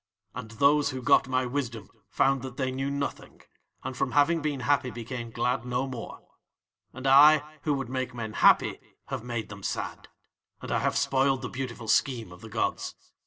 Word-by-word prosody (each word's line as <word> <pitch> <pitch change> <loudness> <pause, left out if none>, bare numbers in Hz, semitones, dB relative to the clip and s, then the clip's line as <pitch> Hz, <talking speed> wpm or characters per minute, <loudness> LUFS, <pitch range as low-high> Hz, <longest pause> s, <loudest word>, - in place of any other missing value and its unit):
And 120 -2 -7
those 140 +5 +3
who 130 -2 -4
got 125 - +4
my 130 -1 +1
wisdom 125 -4 -3 0.2
found 135 -1 +2
that 130 -1 -8
they 130 -2 -1
knew 135 +1 -2
nothing, 140 0 -5 0.4
and 130 - -5
from 130 0 -1
having 160 +3 +3
been 145 -3 -2
happy 140 -1 +1
became 120 +1 -6
glad 120 +1 -1
no 125 +1 -1
more. 125 -4 -8 0.6
"'And 130 +1 -9
I, 150 +3 +6
who 150 -2 +2
would 135 -2 -3
make 130 0 -3
men 115 -3 -6
happy, - - +4 0.3
have 130 -4 -4
made 120 -2 -4
them 100 -1 -9
sad, - - -4 0.5
and - - -7
I - - +2
have - - 0
spoiled 135 0 +2
the 125 - -3
beautiful 125 -3 -6
scheme 115 -4 +1
of 90 - -13
the 115 - -10
gods. - - -2
130 Hz, 185 wpm, -28 LUFS, 120-140 Hz, 0.6 s, I